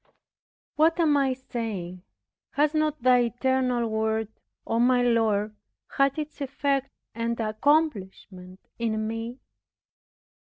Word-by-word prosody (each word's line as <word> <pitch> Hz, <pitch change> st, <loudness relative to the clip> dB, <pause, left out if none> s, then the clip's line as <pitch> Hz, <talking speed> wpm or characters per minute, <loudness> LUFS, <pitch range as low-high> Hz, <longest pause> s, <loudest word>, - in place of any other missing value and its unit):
What 320 Hz, +3 st, +3 dB
am 310 Hz, -3 st, +4 dB
I 275 Hz, -2 st, +2 dB
saying? 215 Hz, -8 st, -5 dB, 0.5 s
Has 295 Hz, +1 st, +2 dB
not 305 Hz, -3 st, 0 dB
Thy 250 Hz, -1 st, +5 dB
eternal 250 Hz, 0 st, 0 dB
Word, 220 Hz, 0 st, -1 dB, 0.4 s
O 230 Hz, -, 0 dB
my 245 Hz, +1 st, +4 dB
Lord, 215 Hz, -3 st, +1 dB, 0.4 s
had 275 Hz, +1 st, +3 dB
its 300 Hz, -1 st, -6 dB
effect 275 Hz, 0 st, -1 dB, 0.2 s
and 230 Hz, +1 st, -2 dB
accomplishment 215 Hz, -, -1 dB, 0.2 s
in 220 Hz, -2 st, -1 dB
me? 225 Hz, +2 st, -5 dB
240 Hz, 110 wpm, -26 LUFS, 220-275 Hz, 0.5 s, Thy